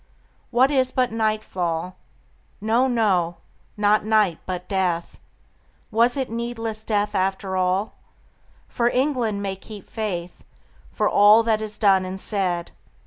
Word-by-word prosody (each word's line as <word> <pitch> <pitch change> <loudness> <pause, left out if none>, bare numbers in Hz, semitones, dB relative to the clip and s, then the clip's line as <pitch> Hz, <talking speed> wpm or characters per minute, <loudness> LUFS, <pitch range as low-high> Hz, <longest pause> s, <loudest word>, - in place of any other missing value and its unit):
What 255 +3 +3
is 260 -2 +2
it - - -20
but 255 -2 +2
nightfall? 185 -6 -2 0.6
No, 225 +5 +2
no, 190 -9 +1 0.4
not 210 +1 +3
night 210 -6 +2
but 180 -1 -4
death; 180 -3 -1 0.7
Was 235 +4 +3
it 265 -2 -1
needless 230 -1 -4
death 210 -1 0
after 190 0 -1
all? 185 +3 0 0.7
For 235 0 +1
England 245 -6 0
may 195 -1 -2
keep 205 0 -12
faith 180 -6 -5 0.5
For - - 0
all 210 +2 +6
that 220 -1 +1
is 215 -1 -6
done 195 -3 +4
and 185 +1 -5
said. 185 -5 -2
210 Hz, 135 wpm, -23 LUFS, 185-230 Hz, 0.7 s, all